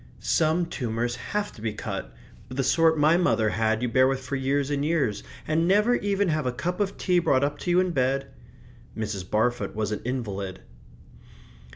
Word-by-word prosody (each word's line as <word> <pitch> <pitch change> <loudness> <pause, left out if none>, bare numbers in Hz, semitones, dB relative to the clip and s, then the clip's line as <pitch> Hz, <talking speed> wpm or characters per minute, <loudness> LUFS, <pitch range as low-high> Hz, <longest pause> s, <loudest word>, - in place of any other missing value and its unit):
"Some 165 +2 +1
tumours 120 -5 -2
have 205 +10 -3
to 110 - -14
be 110 -1 -2
cut; - - -5 0.4
but 130 0 -9
the 135 - +1
sort 160 +3 +3
my 155 +3 +4
mother 110 -11 +2
had 110 +1 0
you - - +1
bear 130 +2 +4
with 135 0 0
for 130 +1 -5
years 140 +1 0
and 140 -1 0
years, 145 -10 0 0.3
and 160 +2 +1
never 210 +5 +4
even 200 -4 +1
have 155 -4 0
a - - +1
cup 175 +10 -3
of 200 -1 -1
tea 180 -2 +2
brought 135 -5 +2
up 145 +1 -1
to - - -4
you 175 +1 +4
in 185 -1 +1
bed." 135 -2 +1 0.7
(Mrs. 100 -4 -4
Barfoot 110 -2 0
was 110 -1 -1
an 105 - -3
invalid.) 100 -7 -4
135 Hz, 195 wpm, -26 LUFS, 115-165 Hz, 0.7 s, my